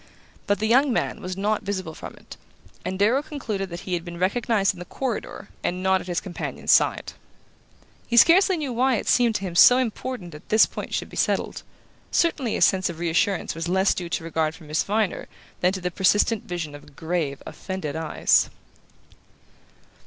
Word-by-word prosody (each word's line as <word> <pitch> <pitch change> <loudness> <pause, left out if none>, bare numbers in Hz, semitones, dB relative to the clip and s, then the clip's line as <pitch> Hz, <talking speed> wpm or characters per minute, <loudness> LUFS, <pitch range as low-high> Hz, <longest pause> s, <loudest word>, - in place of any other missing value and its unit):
But 205 - +2
the 215 - -2
young 260 +5 +4
man - - -1
was 185 0 -5
not 210 +2 0
visible 185 -5 -4
from - - -9
it, - - -13 0.5
and 190 - -3
Darrow 225 +8 +3
concluded 225 -11 -4
that 170 0 -7
he 185 - -5
had 170 -1 -1
been 170 -1 -8
recognized 200 +2 +1
in 180 - -13
the 180 - -7
corridor 235 -3 -5
and 180 +1 -2
not 190 0 +2
at - - -11
his 175 -1 -1
companion's 185 -3 -3
side. - - +3 0.9
He 235 - 0
scarcely 365 - +6
knew 285 -5 -3
why 255 +2 +2
it - - -4
seemed 235 -3 +3
to - - -1
him 185 -3 -5
so 245 +8 +8
important 245 -5 -3
that 150 -1 -13
this 215 0 +6
point - - -6
should - - -3
be - - -10
settled; - - 0 0.5
certainly 285 -9 +1
his - - +5
sense 190 -2 +1
of 170 - -6
reassurance 170 +3 0
was 165 +1 -4
less 190 +2 +3
due 175 -2 -5
to 170 - -2
regard 160 -1 -1
for 175 - -15
Miss 155 0 -1
Viner 210 -2 -1 0.3
than 180 - +3
to 190 -1 -5
the 180 0 -2
persistent 205 +4 +2
vision 170 -4 -5
of 145 -1 -13
grave 160 -4 -3
offended 185 -7 -5
eyes... 160 -1 +2
190 Hz, 190 wpm, -24 LUFS, 175-225 Hz, 0.9 s, so